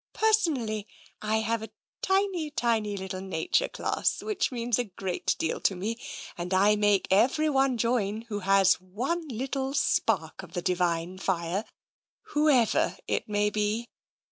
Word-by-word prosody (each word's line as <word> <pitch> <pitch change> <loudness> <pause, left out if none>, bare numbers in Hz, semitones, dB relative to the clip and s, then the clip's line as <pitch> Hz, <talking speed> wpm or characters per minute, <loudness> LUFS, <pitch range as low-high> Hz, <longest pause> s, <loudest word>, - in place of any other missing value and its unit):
Personally, 275 - +1 0.3
I 220 +1 +1
have 225 0 -1
a 220 - -7 0.3
tiny, 380 -5 +1
tiny 225 -6 0
little 190 -1 -5
nature 190 - 0
class - - -1
which 425 -8 -1
means 240 -2 0
a 245 - 0
great 190 -2 -2
deal 160 - -2
to 195 - +2
me. 215 +6 -3 0.4
And 180 +2 -2
I 205 +3 +5
make 205 -2 +2
everyone 270 +4 +3
join 225 -2 0
who 215 -3 -4
has 195 -1 +4
one 255 - -3
little 265 +2 -3
spark 280 - +1
of - - -13
the 175 - -2
Divine 175 0 0
Fire, 185 +2 -1 0.6
whoever 295 -7 +3
it - - -1
may 210 0 +1
be. 215 +3 -1
215 Hz, 145 wpm, -28 LUFS, 195-265 Hz, 0.6 s, I